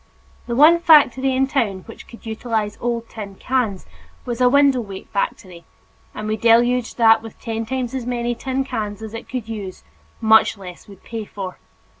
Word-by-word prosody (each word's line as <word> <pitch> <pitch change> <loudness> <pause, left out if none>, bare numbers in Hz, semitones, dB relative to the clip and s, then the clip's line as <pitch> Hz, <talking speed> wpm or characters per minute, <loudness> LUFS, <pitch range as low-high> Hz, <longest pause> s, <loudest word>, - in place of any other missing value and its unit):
The 235 - -2
one 315 +6 +6
factory 270 -5 +5
in 265 +1 +3
town 230 -9 -1
which 225 - -13
could 235 - -14
utilize 220 -2 -3
old 235 -1 -2
tin 205 -4 -8
cans 230 -5 -2 0.4
was 240 -1 -4
a 250 - +6
window 280 -1 +4
weight 195 -3 -9
factory, 185 -4 -4 0.5
and 215 - -5
we 215 0 -1
deluged 240 +2 +3
that 225 -1 +5
with 225 -1 -12
ten 225 -1 -4
times 260 0 -3
as 255 -3 -4
many 240 -1 -1
tin 260 +2 -2
cans 220 -5 -5
as 220 0 -8
it 230 - -8
could 250 -4 -5
use 205 -5 -7 0.4
much 220 -1 +4
less 180 -3 -11
would 200 -2 -15
pay 225 -2 -6
for. 195 -3 -8
230 Hz, 180 wpm, -20 LUFS, 215-250 Hz, 0.5 s, one